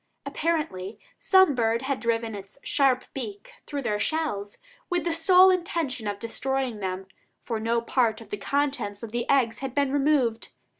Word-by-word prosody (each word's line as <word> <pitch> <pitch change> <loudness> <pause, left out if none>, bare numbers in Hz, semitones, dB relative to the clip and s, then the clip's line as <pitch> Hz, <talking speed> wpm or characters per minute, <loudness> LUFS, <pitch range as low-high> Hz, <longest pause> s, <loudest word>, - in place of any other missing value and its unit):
Apparently 285 - -2 0.2
some 380 -5 +5
bird 230 -1 +1
had 270 0 -1
driven 230 -1 -1
its 200 +3 -9
sharp 265 -3 +2
beak 210 -6 -6 0.2
through 285 -2 -4
their 210 -3 -1
shells, 210 -10 -2 0.3
with 350 -1 0
the 340 - 0
sole 365 +3 +6
intention 325 - -2
of 205 -1 -2
destroying 250 +1 -2
them, 190 -1 -4 0.3
for 230 -2 -4
no 230 +2 +1
part 235 -2 +1
of 225 -3 -14
the 205 - -2
contents 245 -3 -1
of 225 - -6
the 240 0 -3
eggs 255 -5 +2
had 265 -2 -5
been 280 -2 +2
removed. 270 -5 +1
245 Hz, 165 wpm, -26 LUFS, 220-285 Hz, 0.3 s, sole